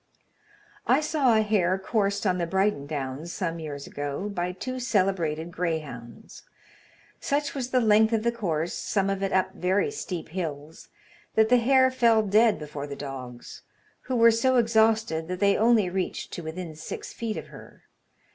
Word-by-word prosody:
I - - +5
saw 295 -6 +2
a 220 - +3
hare 190 -4 +1
coursed 200 +1 -1
on 180 -2 +1
the 170 - -1
Brighton 190 -6 0
Downs 145 +2 -4
some 170 -3 -3
years 145 -3 -6
ago 145 +8 -4
by 180 -2 -2
two 255 +8 -5
celebrated 185 -8 0
greyhounds. 155 -10 -5 0.8
Such 285 0 -1
was 255 -3 -4
the 255 - +2
length 220 -1 +4
of 225 -1 +1
the 235 - +2
course, 175 -8 -2
some 195 -1 -1
of 195 0 -3
it 195 - -1
up 190 -1 +1
very 190 - 0
steep 180 - -5
hills, 160 -3 -6 0.5
that 220 0 +4
the 250 - +6
hare 260 +2 +4
fell 230 -4 +3
dead 215 +2 +4
before 150 -1 -7
the 140 - -6
dogs, 130 -3 -8 0.5
who 255 - 0
were 230 -1 +6
so 255 +3 +2
exhausted 220 -8 +2
that 180 0 -4
they 200 0 +4
only 225 -3 +4
reached 185 +1 -3
to - - -5
within 160 0 -6
six 155 - -7
feet 225 -2 -4
of - - -7
her. - - -14
190 Hz, 170 wpm, -26 LUFS, 160-225 Hz, 0.8 s, the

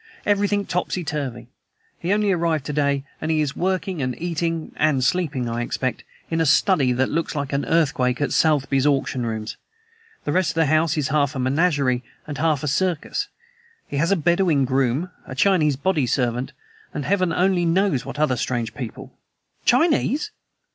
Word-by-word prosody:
Everything 205 0 +1
topsy 180 +1 -2
turvy. 135 -6 -4 0.5
He 175 - -2
only 205 0 +2
arrived 165 -5 0
to 150 - -3
day, 140 -1 +1 0.2
and 155 - -2
he 160 -1 +2
is 145 -3 -1
working 185 -2 -1
and 125 -1 -3
eating 165 -1 -2
(and 150 -4 +2
sleeping 150 -6 0
I 115 +1 -2
expect), 130 +1 -2 0.3
in 165 0 +1
a - - +2
study 145 -3 +4
that 130 +2 0
looks 165 +1 -1
like 145 -1 -3
an 140 - 0
earthquake 130 -6 +1
at 145 - 0
Sotheby's 140 -3 +2
auction 135 -3 0
rooms. 110 -1 -4 0.7
The 145 - -2
rest 185 +2 +2
of - - -2
the 165 0 +3
house 155 +1 +2
is 145 -3 0
half 145 -1 +1
a - - -3
menagerie 135 -2 +1 0.2
and 145 -2 -6
half 155 -3 +1
a - - -1
circus. 180 - -1 0.6
He 140 - -4
has 165 +6 +1
a - - +5
Bedouin 170 -4 +2
groom, 135 +6 0 0.2
a 130 - -7
Chinese 155 -4 +3
body 150 -2 0
servant, 125 +1 0 0.4
and 145 - -3
Heaven 185 -3 +1
only 180 +1 +2
knows 170 - +2
what 135 +2 -7
other 150 -4 +1
strange 120 -1 -2
people!" 120 -5 -7 0.5
"Chinese!" 300 - +2
150 Hz, 175 wpm, -22 LUFS, 135-175 Hz, 0.7 s, a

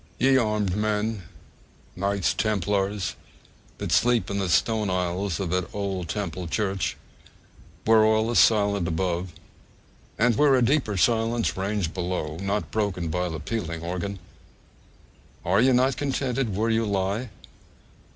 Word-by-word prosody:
Ye 135 +1 +4
armed 105 -6 +1
men, 105 -2 -1 0.7
knights 100 0 0
templars, 100 -1 -1 0.6
that - - -4
sleep 120 -3 +2
in 100 - -1
the 95 -2 -1
stone 105 +4 +2
aisles 90 0 -1
of 95 -4 -2
that 90 -1 -1
old 95 -4 -3
Temple 90 -4 -3
church, 95 0 -1 0.9
where 110 -1 +6
all 110 +1 +2
is 120 - +4
silent 100 -4 +3
above, 85 +1 -2 0.9
and 115 +1 +3
where 145 +2 +4
a 125 - +3
deeper 125 -6 +1
silence 115 +5 +1
reigns 95 -1 -1
below 85 -3 -3
(not 100 +2 -2
broken 100 -6 -1
by 90 +2 -1
the 80 -1 -5
pealing 85 -2 -4
organ), 90 +3 -3 1.3
are 95 +5 +3
ye 130 +2 +5
not 130 +1 +2
contented 135 -5 -1
where 110 +3 +1
ye 110 - +2
lie? 100 +3 -1
100 Hz, 135 wpm, -25 LUFS, 90-110 Hz, 1.3 s, where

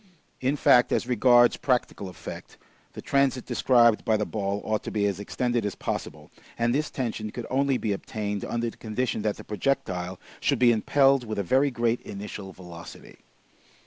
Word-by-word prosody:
In 130 +3 0
fact, 125 -3 +5
as - - +1
regards 120 0 +5
practical 125 -6 -1
effect, 90 - -9 0.4
the - - -9
transit 140 -2 +1
described 115 -3 +3
by 110 -2 +2
the 105 - -1
ball 100 -1 -2
ought 110 -1 0
to - - -3
be 105 -1 0
as 100 -2 -1
extended 120 +3 -1
as 105 -2 -3
possible, - - -5 0.3
and 120 0 +1
this 150 +3 0
tension 115 -4 -3
could 115 +2 -6
only 135 0 +2
be 105 -4 -1
obtained 105 0 -4
under 120 0 -2
the - - -19
condition 110 +1 -2
that 105 -1 -1
the - - -10
projectile 95 -5 -2 0.2
should - - +1
be 120 -1 +5
impelled 135 +4 +3
with 110 -2 -5
a 100 - 0
very 135 +9 +3
great 120 -1 0
initial 100 -1 -7
velocity. 90 -2 -12
115 Hz, 175 wpm, -26 LUFS, 105-125 Hz, 0.4 s, fact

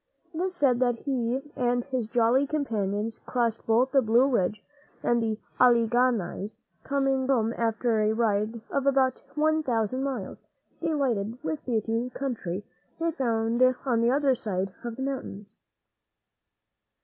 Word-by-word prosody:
It 320 - -3
is 370 0 -2
said 265 -7 +3
that 245 -2 +2
he 260 -1 -1
and 245 -1 +1
his 255 -4 -3
jolly 245 +4 +3
companions 225 -7 -2
crossed 235 -3 -1
both 240 +4 +3
the 270 - +5
Blue 235 +2 +4
Ridge 215 -6 0 0.4
and 240 0 +2
the 220 -1 -1 0.2
Al´le 235 -2 +5
gha 245 +3 +4
nies, 210 0 -4 0.3
coming 270 -1 0
home 230 -4 +2
after 230 0 0
a 215 0 +2
ride 220 0 0
of 275 0 0
about 265 -2 +2
one 310 +1 +2
thousand 250 -1 -1
miles, 255 -8 -4 0.4
delighted 250 -9 0
with 310 -1 -3
the 230 -4 +1
beautiful 230 +3 -3
country 215 -8 -3 0.3
they 330 - -3
had 330 -1 0
found 230 -1 0 0.2
on 240 -3 +2
the 235 - +3
other 275 +1 +3
side 195 -7 -3
of 235 -1 -4
the 265 - -4
mountains. 255 -7 -5
240 Hz, 155 wpm, -27 LUFS, 225-270 Hz, 0.4 s, the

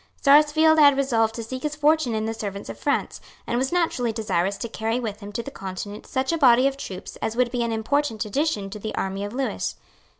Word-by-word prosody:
Sarsfield 305 +2 +5
had 285 -2 +7
resolved 225 -5 +1
to 230 - -4
seek 255 +3 -6
his 300 +1 -3
fortune 300 -5 +2
in 215 0 -1
the 225 - -2
service 200 -3 -6
of - - -7
France, - - -1 0.2
and 240 - -1
was 265 +1 -1
naturally 325 -9 +1
desirous 200 -3 -1
to 235 - -4
carry 225 +2 -2
with 215 -4 -4
him 205 -1 -9
to 235 - -3
the 280 - -7
Continent 195 0 -7
such 265 +3 -1
a 330 - -1
body 255 -2 +6
of 275 0 +1
troops 190 -9 -8
as 220 - -3
would 245 -1 +1
be 245 -1 -1
an 235 -1 0
important 225 0 0
addition 210 -4 -1
to 210 - -7
the 215 +1 -5
army 195 +1 -2
of 205 - -4
Lewis. 265 +3 -2
235 Hz, 230 wpm, -24 LUFS, 215-280 Hz, 0.2 s, had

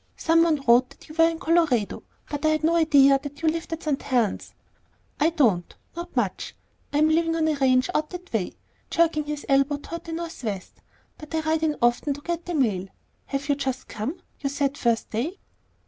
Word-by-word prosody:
Some 330 0 +3
one 315 -4 +2
wrote 245 +2 +5
that 275 - -17
you 310 - -11
were 330 +1 +5
in 330 - -4
Colorado, 320 - +1 0.3
but 290 0 -5
I 310 - +4
had 310 0 +1
no 330 +2 +3
idea 280 -4 +5
that 285 +2 -9
you - - +2
lived 330 +1 -4
at 325 0 -4
St. 295 -3 -1
Helen's." 240 -7 -1 0.6
"I 310 - +4
don't; 235 - +1 0.2
not 345 +1 -7
much. - - -2 0.4
I'm 300 +2 +3
living 330 +1 +2
on 320 -1 +1
a 315 - +2
ranch 260 -3 +3
out 305 0 0
that 360 -3 -9
way," 205 -5 -1 0.4
jerking 325 -3 +2
his 295 0 -5
elbow 275 +1 +3
toward 335 +3 -8
the 330 - -6
northwest, 270 - -5 0.4
"but 305 +1 -7
I 320 - +1
ride 315 0 0
in 310 -2 +1
often 240 +4 +2
to 290 - -11
get 340 +1 -3
the 350 - -3
mail. 205 -10 +1 0.4
Have 275 0 -3
you 290 - +3
just 265 -2 -3
come? 270 - -4 0.2
You 280 - -2
said 280 -1 0
the - - -13
first 230 -2 0
day." 280 - -2
295 Hz, 210 wpm, -25 LUFS, 270-325 Hz, 0.6 s, wrote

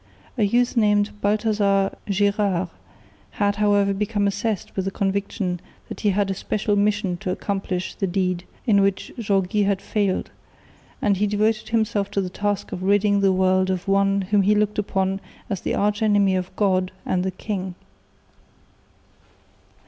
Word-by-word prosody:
A 245 - -2
youth 240 +5 +2
named 210 -2 +3
Balthazar 205 -2 +1
Gérard 200 -2 +1 0.7
had 205 0 +1
however 205 -1 +3
become 205 +1 -1
obsessed 200 0 -2
with 190 - -1
the - - 0
conviction 195 -1 -2 0.3
that - - -7
he 210 - +2
had 195 0 +1
a - - 0
special 205 +2 -1
mission 205 -3 +1
to 190 0 -5
accomplish 185 -1 -2
the 195 - -2
deed 180 -1 -1 0.2
in 205 -5 +4
which 195 -1 0
Jaureguy 200 -1 +1
had 200 -1 +1
failed, 200 -2 -1 0.7
and 200 -2 +3
he 210 +2 +1
devoted 215 +1 0
himself 220 -3 0
to 200 - -1
the 180 -1 -4
task 205 +1 -2
of 180 - -5
ridding 205 +1 +3
the 195 -1 +4
world 185 0 +2
of 185 0 -2
one 195 0 +3
whom 205 -1 +5
he 205 +2 +3
looked 210 0 +1
upon 195 -1 -1 0.3
as 195 - -2
the - - -1
arch 210 +2 0
enemy 205 -3 +3
of 185 -1 -3
God 185 -2 +1
and 180 -1 0
the 190 - 0
king. 185 -1 -4
200 Hz, 160 wpm, -23 LUFS, 190-210 Hz, 0.7 s, whom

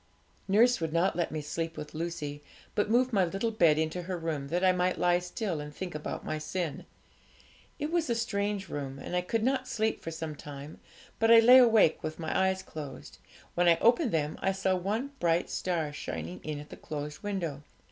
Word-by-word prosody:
Nurse 230 +3 +4
would 160 -1 -1
not 170 +3 +2
let 175 - -1
me 155 -1 -3
sleep 165 +2 -4
with 150 0 -7
Lucy, 155 -3 -4 0.3
but 205 0 0
moved 250 +2 +3
my 195 -3 +4
little 195 +6 -1
bed 170 -9 +4
into 160 +3 -1
her 180 +1 -4
room, 160 -4 -3
that 175 +5 -1
I 185 - +6
might 180 0 +1
lie 175 0 +3
still 180 -1 -3
and 150 0 -7
think 180 +4 -6
about 150 0 -5
my 155 - -2
sin. 165 +1 -4 0.9
It 300 +1 -3
was 335 -4 +1
a 235 - +2
strange 205 -3 -1
room, 140 -3 -5
and 140 +6 -5
I 180 - +2
could 220 +5 -1
not 265 +2 +1
sleep 220 0 -1
for - - -5
some 160 -2 -5
time, 145 +1 -9 0.4
but 225 0 +3
I 230 0 +10
lay 250 +3 +9
awake 225 -9 +5
with 155 0 -4
my 160 -2 -3
eyes 190 0 +2
closed. 140 - -9 0.3
When 175 0 +2
I 170 -1 +6
opened 240 +2 +3
them 155 -2 -1
I 195 - +1
saw 190 0 +1
one 215 +9 -2
bright 170 0 +1
star 165 -5 -1
shining 85 - -5
in 155 -1 -4
at 150 - -10
the - - -9
closed 150 0 -6
window. 175 -9 -3
175 Hz, 210 wpm, -30 LUFS, 155-205 Hz, 0.9 s, I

